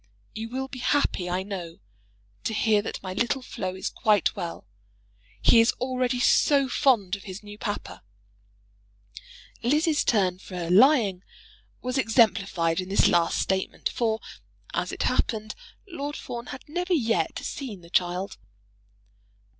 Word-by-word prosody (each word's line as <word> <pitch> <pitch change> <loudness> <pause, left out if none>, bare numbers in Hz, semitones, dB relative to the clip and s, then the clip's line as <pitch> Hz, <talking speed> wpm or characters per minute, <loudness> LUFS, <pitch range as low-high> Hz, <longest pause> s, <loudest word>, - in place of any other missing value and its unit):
You 225 +1 -5
will 265 +2 -3
be 265 -1 -8
happy, 240 -9 +1
I 180 +1 -1
know, 180 -4 -6 0.7
to 220 - -1
hear 210 -1 +3
that 205 - -6
my 185 -1 -4
little 240 +6 0
Flo 185 -7 -4
is 190 - -4
quite 210 -4 +2
well. 170 - -5 0.8
He 235 - +7
is 230 +1 +4
already 255 0 -1
so 275 +2 +4
fond 235 -9 +2
of 200 - -12
his 190 +1 -8
new 210 0 -11
papa! 205 - -5 1.6
[Lizzie's 300 +5 +2
turn 185 -5 +2
for 175 -3 -5
lying 215 -4 +5 0.6
was 255 +2 -1
exemplified 195 -8 +2
in 185 - -8
this 200 - +4
last 170 -1 +2
statement, 190 0 -1
for, 225 -2 0 0.5
as - - -1
it - - -3
happened, 215 -1 0 0.3
Lord 295 -5 -5
Fawn 235 0 -6
had 260 - -9
never 355 +4 0
yet 225 - 0
seen 230 -10 -6
the 170 0 -16
child. 180 +2 0
215 Hz, 140 wpm, -26 LUFS, 185-255 Hz, 1.6 s, He